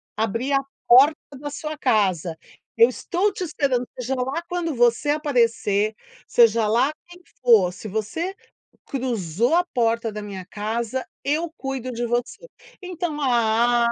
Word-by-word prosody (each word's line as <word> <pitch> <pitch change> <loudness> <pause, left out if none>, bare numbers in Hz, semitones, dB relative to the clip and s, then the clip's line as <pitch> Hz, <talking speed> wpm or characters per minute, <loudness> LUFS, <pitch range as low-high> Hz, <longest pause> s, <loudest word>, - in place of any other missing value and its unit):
Abrir 230 +5 -1
a 275 - +4 0.3
porta 270 +6 +7 0.2
da 290 - -5
sua 305 +1 -6
casa. 190 - +1 0.4
"Eu 460 +1 +7
estou 395 +3 -1
te 385 - -4
esperando, 270 -6 -1
seja 250 +1 -2
lá 265 +5 -2
quando 345 -4 -2
você 240 +4 +3
aparecer, 230 -8 +1 0.3
seja 230 -2 +4
lá 245 +6 +2 0.2
quem 350 +1 -15 0.2
for. 220 -8 +5
Se 200 +4 -9
você 220 - -3 0.5
cruzou 240 - -1
a 355 - +4
porta 230 -2 +1
da 210 0 -6
minha 195 -3 -7
casa, 225 +5 -3 0.2
eu 315 +4 0
cuido 265 -2 -4
de 240 0 -3
você". 240 - -3 0.4
Então, 350 -4 -4
ah, 235 -1 +3
245 Hz, 140 wpm, -23 LUFS, 220-295 Hz, 0.5 s, porta